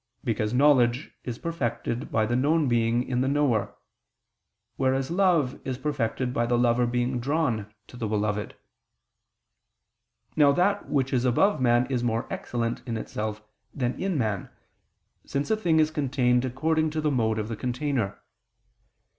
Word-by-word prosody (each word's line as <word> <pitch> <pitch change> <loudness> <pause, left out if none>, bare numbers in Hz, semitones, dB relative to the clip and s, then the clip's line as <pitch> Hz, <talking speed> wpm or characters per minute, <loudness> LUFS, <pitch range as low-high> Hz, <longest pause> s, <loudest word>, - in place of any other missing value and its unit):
Because 110 -3 -1
knowledge 125 -1 +3
is 120 -2 -5
perfected 125 -7 -3
by 110 -1 +2
the 120 +2 -1
known 150 +4 +2
being 120 0 +2
in 125 -1 -1
the 130 - +1
knower: 135 -7 +1 1.0
whereas 135 +1 0
love 170 -8 +2
is 130 -2 -3
perfected 130 -3 -2
by 120 -1 0
the 120 0 +2
lover 120 0 +3
being 125 +1 -1
drawn 120 -6 -1
to 125 - -13
the 115 -3 -2
beloved. 105 -1 -1 1.8
Now 145 -2 +5
that 200 +5 +1
which 135 -3 0
is 125 -2 +2
above 130 - +2
man 120 0 +4
is 125 -2 0
more 115 -1 0
excellent 115 -1 -3
in 115 -1 -2
itself 105 -1 -4 0.3
than 125 -2 -1
in 190 -4 0
man: 105 -7 -1 0.7
since 140 +8 -2
a - - +4
thing 170 -7 +2
is 155 0 +3
contained 130 -4 +1
according 155 +5 0
to 155 0 -2
the 150 -1 +1
mode 110 -4 +1
of 105 -1 -2
the 115 - -4
container. 125 -2 -2
125 Hz, 155 wpm, -26 LUFS, 115-145 Hz, 1.8 s, Now